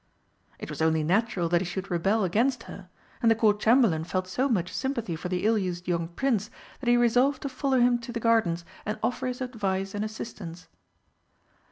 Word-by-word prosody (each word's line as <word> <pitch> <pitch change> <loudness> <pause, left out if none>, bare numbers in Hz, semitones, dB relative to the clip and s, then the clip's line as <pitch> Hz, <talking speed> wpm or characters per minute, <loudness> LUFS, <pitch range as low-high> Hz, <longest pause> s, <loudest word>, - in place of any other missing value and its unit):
It - - -7
was - - -5
only 160 -1 +2
natural 190 +1 +1
that 175 0 +3
he - - -2
should 190 +2 -5
rebel 195 +5 +1
against 230 +7 +1
her, 190 -2 -11 0.3
and 230 - +4
the 225 - +5
Court 215 -2 +3
Chamberlain 220 -9 +4
felt 185 +2 -2
so 255 +9 0
much 185 -7 0
sympathy 235 -10 -2
for 175 +3 -5
the 180 +1 -1
ill 220 0 +3
used 180 -2 -4
young 170 -2 0
prince 215 +3 -1 0.3
that 250 - -1
he 240 - +5
resolved 250 +3 +3
to 280 - -2
follow 265 0 0
him 240 0 +4
to 240 +1 -8
the 235 - -3
gardens 215 -8 +2 0.2
and 210 - -3
offer 250 - -1
his 250 0 -4
advice 195 -6 -2
and 205 0 -2
assistance. 195 -5 -7
215 Hz, 200 wpm, -27 LUFS, 180-240 Hz, 0.3 s, the